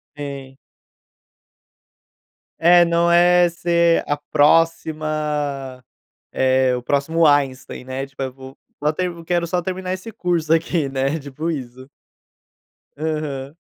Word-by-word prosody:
Sim. 140 -2 -7 2.0
É, 175 +1 +6
não 170 0 +2
é 175 0 +5
ser 170 0 +2
a 145 - 0
próxima, 150 -3 0 0.5
eh, 130 -1 +2
o 125 - -5
próximo 160 +5 +1
Einstein, 140 -4 +1
né. 130 +1 -5
Tipo 135 0 -11
eu 130 - -4
vou 135 0 -13 0.2
vo 150 - -1
até 180 +4 0
eu 170 -1 -9
quero 175 0 0
só 180 +1 0
terminar 185 +1 -4
esse 190 +4 -7
curso 170 -6 0
aqui 165 -2 0
né, 135 +3 -1
tipo 145 +4 -5
isso. 130 -3 -7 1.1
Aham. 150 -3 -4
150 Hz, 125 wpm, -20 LUFS, 135-170 Hz, 2.0 s, É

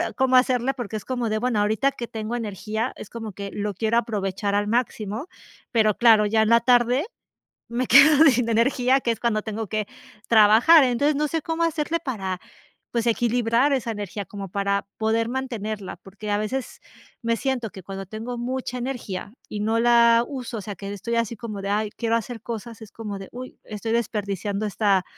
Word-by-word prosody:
cómo 260 -1 +2
hacerle 255 +1 +3
porque 235 -4 -5
es 210 - -9
como 245 -3 -2
de 215 0 0
bueno, 235 -2 0
ahorita 220 +7 +2
que 245 -3 -6
tengo 220 +1 -4
energía 220 +1 -3
es - - -9
como 225 -2 -6
que 200 +1 -7
lo 205 0 -3
quiero 220 +4 0
aprovechar 200 -3 -1
al 205 0 +1
máximo, 225 - -2 0.4
pero 215 -3 +3
claro, 220 -3 +6
ya 220 +1 +3
en 220 - +1
la 235 0 +6
tarde 245 - +3 0.7
me 250 +2 0
quedo 290 +4 +7
sin 250 -4 +3
energía, 250 +3 +3
que 235 -2 +1
es 225 - -7
cuando 220 -3 0
tengo 220 -1 -4
que 215 -1 -2 0.4
trabajar. 230 +9 +7
Entonces 270 +4 +2
no 300 +1 0
sé 325 +1 -1
cómo 325 +2 -2
hacerle 330 0 0
para 190 -8 -3 0.5
pues, 235 0 -1
equilibrar 235 +3 +2
esa 255 -4 -1
energía 205 -2 -4
como 195 -1 -8
para 200 +1 -1
poder 225 +1 +1
mantenerla, 220 -6 -4
porque 195 +4 -9
a 205 - +2
veces 250 +5 -4 0.4
me 230 0 +1
siento 255 -5 -2
que 190 - -10
cuando 195 +2 -7
tengo 225 +5 -6
mucha 250 +1 -3
energía 230 -6 -5 0.2
y 205 - -4
no 220 +2 +1
la 235 0 +5
uso, 255 -4 -5
o - - -5
sea, 200 +1 -6
que 200 +2 -6
estoy 235 +4 -3
así 230 0 0
como 215 -3 -6
de: 200 - -3
"Ay, 210 +1 0
quiero 230 -1 +1
hacer 230 +1 -3
cosas", 230 -1 -7
es 215 - -13
como 210 -3 -6
de: 195 -1 -9
"Uy, 255 +1 -9
estoy 225 +1 -4
desperdiciando 205 -2 -2
esta 200 -2 +2
230 Hz, 195 wpm, -24 LUFS, 210-245 Hz, 0.7 s, quedo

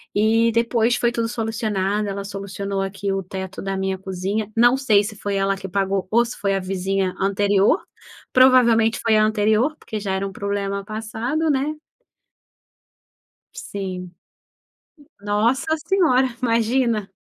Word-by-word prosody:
E 225 +2 +3
depois 230 +1 +2
foi 240 -1 +1
tudo 230 -1 -1
solucionado, 215 -3 -1
ela 200 0 -4
solucionou, 200 0 -4
aqui, 195 +1 -3
o 195 0 -1
teto 190 +1 -6
da 195 0 -3
minha 190 0 -1
cozinha. 195 +3 -3
Não 240 +2 +5
sei 215 -7 +3
se 215 +1 -6
foi 200 0 -3
ela 195 0 +1
que 190 0 -7
pagou 195 0 -1
ou 235 +2 +3
se 235 - -7
foi 200 -2 0
a - - 0
vizinha 190 0 -1
anterior. 200 - +2 0.5
Provavelmente 245 -3 +5
foi 220 -1 +3
a 215 - +4
anterior, 215 +7 +2
porque 215 - -6
já 195 -2 -3
era 195 +1 -1
um - - -7
problema 200 0 -3
passado, 225 +8 -2
né. 285 +2 0 1.8
Sim. 185 - -6 1.1
Nossa 235 +10 +1
senhora, 305 -7 +2
imagina. 230 -3 +1
210 Hz, 145 wpm, -22 LUFS, 195-235 Hz, 1.8 s, Não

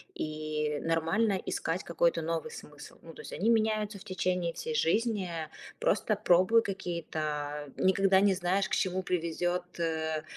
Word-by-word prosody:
И 155 -1 -2
нормально 175 +6 +1
искать 165 +3 -2
какой-то 170 0 +1
новый 165 0 -2
смысл. 150 0 -11
Ну, 165 - -11
то - - -15
есть, - - -9
они 220 +5 0
меняются 215 -2 +1
в - - -14
течение 180 -3 -1
всей 470 0 -4
жизни. 220 - +1 0.5
Просто 215 +1 +2
пробуй 205 +3 +4
какие-то 155 -6 -4
никогда 190 0 +4
не 200 -1 +4
знаешь, 185 +2 0
к - - +1
чему 185 -4 0
привезёт, 175 0 -1
э, 160 -2 -1
180 Hz, 145 wpm, -30 LUFS, 160-200 Hz, 0.5 s, пробуй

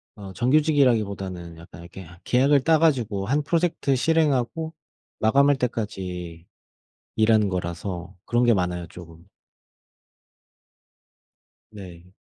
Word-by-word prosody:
아 100 -3 -10
정규직이라기보다는 110 - +1
약간 85 -1 -13
이렇게 85 +2 -11
하 85 -1 -14
계약을 135 +2 +3
따 160 +2 +3
가지고 115 -11 0
1 145 +4 +1
프로젝트 165 -4 0
실행하고 160 +1 0 0.5
마감할 140 +5 +3
때까지 90 -8 -5 0.7
일하는 110 -2 +3
거라서 90 +1 -5
그런 120 +1 +1
게 120 - +4
많아요 90 -2 -2
쪼금. 85 -1 -14 2.5
네. 90 -4 -12
105 Hz, 255 characters per minute, -24 LUFS, 90-135 Hz, 2.5 s, 게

